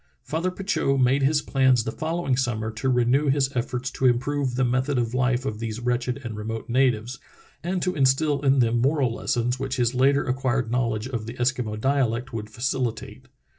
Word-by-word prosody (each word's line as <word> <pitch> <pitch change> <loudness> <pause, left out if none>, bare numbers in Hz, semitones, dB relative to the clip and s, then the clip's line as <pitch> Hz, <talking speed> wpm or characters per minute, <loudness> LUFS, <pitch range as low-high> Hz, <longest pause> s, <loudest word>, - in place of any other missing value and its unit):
'* - - -47
Father 165 +4 0
Petitot 185 -7 -1
made 130 +2 +3
his 150 +2 +2
plans 130 -4 +3
the 110 - -3
following 160 -3 -1
summer 115 -4 -1
to 110 +5 -2
renew 125 +4 +2
his 135 -1 +1
efforts 125 +1 -2
to 130 - +1
improve 130 +1 0
the 130 0 +2
method 130 +3 0
of 120 -1 -1
life 125 0 +1
of 110 -5 -3
these 115 0 -4
wretched 125 +2 -1
and 115 -3 -5
remote 110 +1 -5
natives, 125 -1 +1 0.4
and 180 +1 -2
to 180 - -1
instil 140 +1 +2
in 135 0 +4
them 120 -2 +2
moral 135 -2 +2
lessons 125 0 -1
which 135 -1 -2
his 120 -1 +1
later 135 +3 +3
acquired 130 -2 -1
knowledge 115 -2 -1
of 115 -4 -4
the 115 - -6
Eskimo 120 -4 -1
dialect 130 -1 0
would 105 -1 -5
facilitate. 120 0 -3
130 Hz, 190 wpm, -24 LUFS, 120-135 Hz, 0.4 s, in